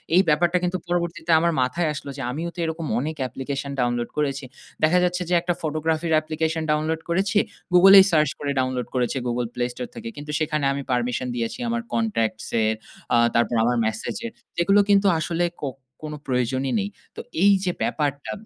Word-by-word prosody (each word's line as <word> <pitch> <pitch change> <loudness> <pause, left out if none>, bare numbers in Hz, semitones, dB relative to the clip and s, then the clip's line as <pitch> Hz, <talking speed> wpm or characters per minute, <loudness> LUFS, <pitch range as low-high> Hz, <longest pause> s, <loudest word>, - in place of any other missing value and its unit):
এই 185 - +7
ব্যাপারটা 170 +4 +3
কিন্তু 180 +1 0
পরবর্তীতে 170 -1 -1
আমার 170 +1 +2
মাথায় 155 +6 0
আসলো 140 - -7
যে - - -5
আমিও 165 +6 -3
তো - - -9
এরকম 160 0 -3
অনেক 155 +4 -3
অ্যাপ্লিকেশন 135 +2 -4
ডাউনলোড 120 -1 0
করেছি। 140 -2 0 0.5
দেখা 175 +4 +5
যাচ্ছে 180 0 0
যে - - +1
একটা 175 +1 0
ফটোগ্রাফির 160 +1 -1
অ্যাপ্লিকেশন 160 +1 -1
ডাউনলোড 155 +1 0
করেছি। 190 +4 +1 0.4
Google 195 +2 +8
এই 190 - +8
সার্চ 155 -2 +3
করে 145 -1 -2
ডাউনলোড 130 -1 -1
করেছি, 125 +1 0
Google 120 -1 -1
Play 125 0 -1
Store 125 0 -6
থেকে, 230 0 -6
কিন্তু 150 +1 -6
সেখানে 155 -2 0
আমি 140 - -3
পারমিশন 125 0 0
দিয়েছি 115 - -3
আমার 235 0 -1
কনট্যাক্টস 215 - -1 0.2
এর, 110 0 +1 0.4
আ - - +5 0.2
তারপর 120 +1 +2
আমার 120 +1 +2
মেসেজের 110 - -3 0.3
যেগুলো 195 +4 +4
কিন্তু 200 0 +5
আসলে 170 +2 0 0.2
কো 145 - -2 0.4
কোন 155 0 -5
প্রয়োজনই 130 +1 0
নেই। 200 0 -2 0.3
তো - - -5 0.2
এই 200 - +7
যে 180 - +1
ব্যাপারটা, 145 -2 -2
155 Hz, 180 wpm, -23 LUFS, 130-175 Hz, 0.5 s, Google